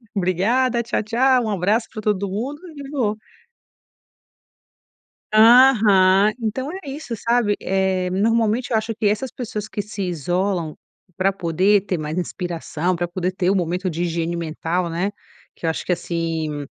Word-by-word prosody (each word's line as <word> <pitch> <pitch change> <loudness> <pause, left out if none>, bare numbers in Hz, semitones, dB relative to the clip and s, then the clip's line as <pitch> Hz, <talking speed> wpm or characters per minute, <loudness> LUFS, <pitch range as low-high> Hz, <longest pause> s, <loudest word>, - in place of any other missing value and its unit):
Obrigada, 225 +7 +1
tchau 235 - -1
tchau, 250 +2 +2
um - - -2
abraço 205 +5 +1
para 215 - -5
todo 200 -2 0
mundo 250 +10 -4 0.2
e 280 -1 -8
vou. 235 -8 0 2.2
Aham, 215 -4 +6
então 260 +8 -2
é 375 -7 -8
isso, 275 -4 -6
sabe, 230 -1 +1
eh, 190 -1 0
normalmente 225 +4 +1
eu - - +3
acho 220 +1 -1
que 215 - -1
essas 215 +5 0
pessoas 215 -3 -5
que 205 - -4
se 205 0 -5
isolam 175 0 -1 0.4
pra 195 +1 +2
poder 190 +3 +2
ter 185 -4 -2
mais 155 +3 -4
inspiração, 175 -1 -2
para 175 +1 -1
poder 180 +1 -2
ter 185 -1 -1
o 195 - +3
momento 180 +1 -1
de 170 +1 -3
higiene 170 0 -1
mental, 170 +1 -2
né, 185 +5 -1 0.4
que 165 - -6
eu - - +2
acho - - -4
que 180 - +1
assim, 165 -4 -3
195 Hz, 155 wpm, -21 LUFS, 175-225 Hz, 2.2 s, Aham